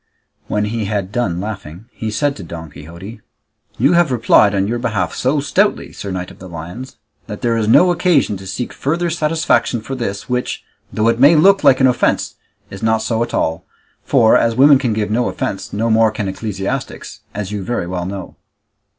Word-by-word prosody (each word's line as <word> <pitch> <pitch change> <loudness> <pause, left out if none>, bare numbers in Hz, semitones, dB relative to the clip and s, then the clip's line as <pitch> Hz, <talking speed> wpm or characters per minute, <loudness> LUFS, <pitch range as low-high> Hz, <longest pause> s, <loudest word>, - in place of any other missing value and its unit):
When 105 0 0
he 110 0 -3
had 100 -2 -2
done 100 -7 -1
laughing, 95 -2 -7
he 110 - -5
said 140 +6 0
to 100 - -8
Don 80 -2 -8
Quixote, 85 +9 -11 0.6
"You 135 +8 +3
have 170 -4 +3
replied 110 -4 +4
on 95 0 +1
your 120 +3 -1
own - - -7
behalf 110 -8 -1
so 135 +4 0
stoutly, 195 +9 0
Sir 100 - -7
Knight 90 -1 -4
of - - -17
the 95 - -10
Lions, 90 +10 -8 0.3
that 105 -2 -7
there 120 -1 +1
is 110 -2 0
no 180 +11 +5
occasion 175 - +2
to 95 0 -10
seek 110 +6 -4
further 170 +4 -1
satisfaction 150 -7 +1
for 120 +5 -7
this, 110 -6 -4
which, 125 0 -2 0.3
though 110 +1 0
it 115 0 +2
may 145 +5 +7
look 195 +6 +5
like 130 - +5
an 130 - +4
offence, 125 -2 +1 0.4
is 95 - -9
not 110 0 +1
so 115 0 -1
at 120 - -2
all, 80 +2 -1 0.4
for, 110 - +4
as 115 -1 +2
women 140 +2 +6
can 125 -5 0
give 105 -1 -2
no 120 +2 +1
offence, 95 - -4
no 115 +2 -1
more 110 0 +4
can 105 -1 -4
ecclesiastics, 95 0 -5 0.2
as 100 -1 -4
you 105 -2 -4
very 120 -4 -2
well 90 0 -4
know." 95 -2 -7
110 Hz, 200 wpm, -17 LUFS, 95-130 Hz, 0.6 s, may